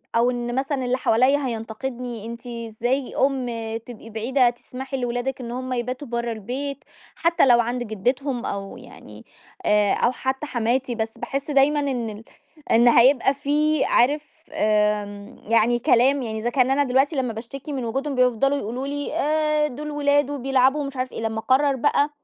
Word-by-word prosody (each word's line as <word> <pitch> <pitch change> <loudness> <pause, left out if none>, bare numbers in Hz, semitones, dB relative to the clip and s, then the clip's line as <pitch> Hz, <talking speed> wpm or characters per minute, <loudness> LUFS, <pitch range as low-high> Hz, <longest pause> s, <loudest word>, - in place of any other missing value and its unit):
أو 235 +2 +3
إن 240 0 -3
مثلًا 270 -1 -1
اللي 250 +1 +1
حواليّا 260 +5 +3
هينتقدني، 235 0 -5
أنتِ 235 +2 -8
إزاي 235 +3 -3
أم 270 -2 +1 0.4
تبقي 230 -2 -11
بعيدة 240 +3 +2
تسمحي 260 +3 -7
لولادِك 245 +2 -2
إن 235 -1 -6
هُم 255 +1 -4
يباتوا 250 +3 -3
برّا 235 0 -2
البيت 260 +6 -5 0.3
حتى 335 -3 +3
لو 240 -2 +6
عند 240 +1 -1
جدتهم 245 +4 -2
أو 195 0 -5
يعني - - -13 0.4
آآ، 210 -4 +3
أو 240 - +2
حتى 265 +3 -3
حماتي، 245 0 0
بس 225 0 -4
باحس 275 +2 -4
دايمًا 285 +1 +4
إن 255 -6 -2
ال 210 +1 -9 0.5
إن 235 +2 +5
هيبقى 255 +3 +5
في 300 +2 +1
عارف 300 +5 +1
آمم، 210 -1 0
يعني 230 +1 +3
كلام، 260 +4 +3
يعني 220 -2 -4
إذا 235 +2 -1
كان 255 0 +2
أنا 285 +1 +3
دلوقتي 270 +4 +2
لمّا 250 -4 -1
باشتكي 275 +6 -7
من 255 -3 -3
وجودهم 270 +5 -2
بيفضلوا 255 +2 +2
يقولوا 255 +3 -4
لي 285 0 -4
آآ، 305 0 +1
دول 300 +2 -6
ولاد 290 -1 +2
وبيلعبوا 270 0 +2
ومش 275 -2 -5
عارف 255 0 -2
إيه، - - -6
لمّا 225 0 -2
اقرر 265 +5 +2
بقى 285 +3 +2
255 Hz, 165 wpm, -23 LUFS, 235-275 Hz, 0.5 s, لو